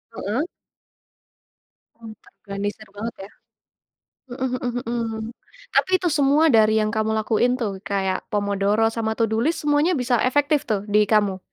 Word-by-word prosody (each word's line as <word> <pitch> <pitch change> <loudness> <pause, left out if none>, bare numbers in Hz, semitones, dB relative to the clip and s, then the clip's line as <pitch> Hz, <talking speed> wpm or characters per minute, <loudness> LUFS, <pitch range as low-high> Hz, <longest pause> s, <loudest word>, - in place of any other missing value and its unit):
Heeh. 240 - -2 1.5
M 230 -1 -11
terorganisir 205 +1 -6
banget 225 +3 -4
ya. - - -24 1.0
Hmm 255 0 -3
hmm 245 -1 -3
hmm, 225 -2 -3 0.5
tapi - - +2
itu 355 - 0
semua 290 +2 +3
dari 220 -1 +4
yang 215 - -1
kamu 220 0 0
lakuin 225 +3 +1
tuh, 205 -6 -3
kayak 195 -1 -2
pomodoro 205 +1 +1
sama 220 -1 -2
to 230 - 0
do 220 - +1
list 305 +6 0
semuanya 295 +4 +2
bisa 245 -3 +1
efektif 290 +2 +1
tuh, 205 -3 -1
di 210 0 +4
kamu? 205 -3 +2
225 Hz, 145 wpm, -22 LUFS, 210-255 Hz, 1.5 s, dari